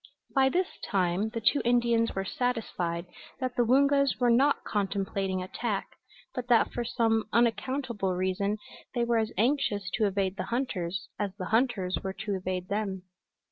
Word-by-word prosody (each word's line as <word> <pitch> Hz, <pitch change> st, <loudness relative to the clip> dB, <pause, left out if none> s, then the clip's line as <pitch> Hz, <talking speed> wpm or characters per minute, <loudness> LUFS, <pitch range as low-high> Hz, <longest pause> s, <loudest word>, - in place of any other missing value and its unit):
By 265 Hz, -1 st, +4 dB
this 365 Hz, +6 st, -1 dB
time 190 Hz, +2 st, +1 dB
the 230 Hz, +1 st, -4 dB
two 280 Hz, +6 st, +3 dB
Indians 235 Hz, -1 st, +2 dB
were 195 Hz, 0 st, -1 dB
satisfied 185 Hz, -8 st, -2 dB, 0.3 s
that 255 Hz, -2 st, -2 dB
the 245 Hz, -, +3 dB
Woongas 280 Hz, +2 st, +4 dB
were 245 Hz, -1 st, +4 dB
not 275 Hz, +5 st, +3 dB
contemplating 195 Hz, -2 st, -1 dB
attack, 200 Hz, +2 st, -3 dB, 0.4 s
but 250 Hz, -1 st, -4 dB
that 240 Hz, -2 st, +4 dB
for 240 Hz, -, -1 dB
some 225 Hz, -2 st, +1 dB
unaccountable 235 Hz, -4 st, +1 dB
reason 190 Hz, +3 st, 0 dB, 0.4 s
they 240 Hz, -, +2 dB
were 235 Hz, -1 st, +2 dB
as 220 Hz, 0 st, -1 dB
anxious 220 Hz, -6 st, +1 dB
to 215 Hz, -2 st, +2 dB
evade 195 Hz, -1 st, -1 dB
the 185 Hz, -, -2 dB
hunters 210 Hz, -5 st, -2 dB
as 200 Hz, -2 st, -2 dB
the 185 Hz, -3 st, -5 dB
hunters 225 Hz, -6 st, +2 dB
were 190 Hz, 0 st, -3 dB
to 205 Hz, +1 st, -4 dB
evade 185 Hz, -1 st, -3 dB
them. 195 Hz, -2 st, -2 dB
220 Hz, 160 wpm, -29 LUFS, 190-245 Hz, 0.4 s, By